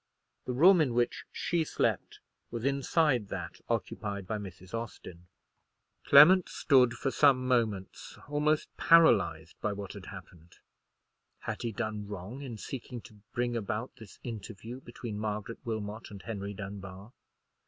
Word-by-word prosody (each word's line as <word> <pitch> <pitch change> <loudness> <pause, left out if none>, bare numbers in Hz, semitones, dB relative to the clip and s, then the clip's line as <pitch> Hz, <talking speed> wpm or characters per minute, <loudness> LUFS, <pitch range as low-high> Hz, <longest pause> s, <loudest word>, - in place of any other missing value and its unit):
The 125 - -2
room 175 +7 +7
in 130 -6 +1
which 120 0 0
she 170 -2 0
slept - - -1 0.3
was 115 +1 -5
inside 140 -3 +2
that - - -6
occupied 100 -2 -2
by 105 +3 -3
Mrs. 95 -1 -10
Austin. 95 -6 -7 0.8
Clement 170 +6 +8
stood 125 -4 +4
for 135 +2 -2
some 130 -3 +4
moments 110 -7 -1
almost 150 +1 0
paralyzed 100 - +4
by 105 - 0
what 100 -1 -6
had - - -10
happened. 85 0 -12 0.8
Had - - -4
he 115 - -2
done 105 -2 -4
wrong 105 +6 -7
in 125 -5 -6
seeking 125 +2 -6
to 105 -1 -16
bring 120 0 -1
about 110 +2 -3
this 110 -5 -13
interview 115 +1 -7
between 120 -3 -7
Margaret 105 +1 -4
Wilmot 110 -1 -4
and 100 -2 -10
Henry 100 -3 -5
Dunbar? 100 +2 -8
115 Hz, 140 wpm, -30 LUFS, 100-130 Hz, 0.8 s, Clement